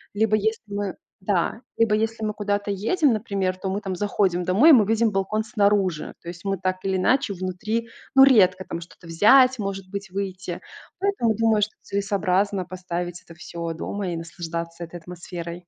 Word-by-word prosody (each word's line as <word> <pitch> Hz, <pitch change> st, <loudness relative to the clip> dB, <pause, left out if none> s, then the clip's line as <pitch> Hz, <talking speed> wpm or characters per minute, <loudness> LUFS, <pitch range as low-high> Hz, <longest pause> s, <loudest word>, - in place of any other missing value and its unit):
либо 215 Hz, 0 st, +3 dB
если 220 Hz, +1 st, -1 dB
мы, 200 Hz, -1 st, -3 dB, 0.3 s
да, 195 Hz, +4 st, 0 dB, 0.2 s
либо 225 Hz, -2 st, +3 dB
если 225 Hz, 0 st, -1 dB
мы 210 Hz, -, -1 dB
куда-то 205 Hz, -1 st, -1 dB
едем, 250 Hz, -, +2 dB
например, 195 Hz, -4 st, -1 dB
то 190 Hz, +1 st, -4 dB
мы 200 Hz, +2 st, -2 dB
там 190 Hz, -2 st, -3 dB
заходим 190 Hz, -2 st, 0 dB
домой, 210 Hz, -, +6 dB
и -, -, +9 dB
мы 225 Hz, -6 st, +6 dB
видим 225 Hz, +1 st, +2 dB
балкон 200 Hz, +3 st, -1 dB
снаружи. 200 Hz, -7 st, +1 dB
То -, -, -15 dB
есть 170 Hz, +1 st, -9 dB
мы 195 Hz, -1 st, -1 dB
так 185 Hz, +1 st, -1 dB
или 190 Hz, -1 st, 0 dB
иначе 250 Hz, +3 st, +2 dB
внутри, 190 Hz, +5 st, -3 dB, 0.3 s
ну, 270 Hz, -, +9 dB
редко 190 Hz, -8 st, +5 dB
там 170 Hz, -, -5 dB
что-то 170 Hz, +1 st, -14 dB
взять, 250 Hz, +9 st, +5 dB
может 195 Hz, -2 st, -4 dB
быть, 200 Hz, -1 st, -5 dB
выйти. 190 Hz, -2 st, -4 dB, 0.4 s
Поэтому, 385 Hz, -, +1 dB
думаю, 225 Hz, -1 st, +2 dB
что 215 Hz, +1 st, 0 dB
целесообразно 200 Hz, -1 st, 0 dB
поставить 175 Hz, -1 st, -5 dB
это 170 Hz, -, -14 dB
всё 170 Hz, 0 st, -5 dB
дома 195 Hz, +3 st, -4 dB
и 170 Hz, -, -3 dB
наслаждаться 170 Hz, 0 st, -6 dB
этой 170 Hz, +1 st, -8 dB
атмосферой. 175 Hz, 0 st, -7 dB
195 Hz, 180 wpm, -24 LUFS, 180-215 Hz, 0.4 s, и